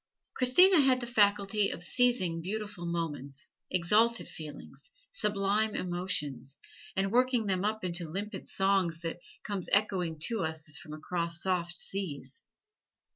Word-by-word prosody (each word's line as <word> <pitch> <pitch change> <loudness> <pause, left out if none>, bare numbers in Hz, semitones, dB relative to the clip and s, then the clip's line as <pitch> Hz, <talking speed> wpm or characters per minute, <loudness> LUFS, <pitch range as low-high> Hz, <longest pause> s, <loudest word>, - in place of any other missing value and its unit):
Christina 310 +8 +6
had 260 -2 +3
the 245 - -5
faculty 205 -2 +2
of 170 - -4
seizing 185 -6 +2
beautiful 200 -1 -5
moments, 145 -5 -4 0.2
exalted 215 +6 +2
feelings, 150 -2 -10 0.2
sublime 210 - +1
emotions, 150 -7 -2 0.4
and 195 0 0
working 250 -1 +2
them 190 -2 0
up 215 0 -1
into 175 -2 -2
limpid 200 +3 -5
song 195 -2 +2
that 165 +1 -4 0.2
comes 200 -4 -4
echoing 185 -5 +2
to 230 -2 -2
us 160 -2 -1
as 155 - -1
from 155 +1 -9
across 170 +2 -2
soft 175 -2 -1
seas. 145 -11 -5
190 Hz, 130 wpm, -30 LUFS, 170-215 Hz, 0.4 s, Christina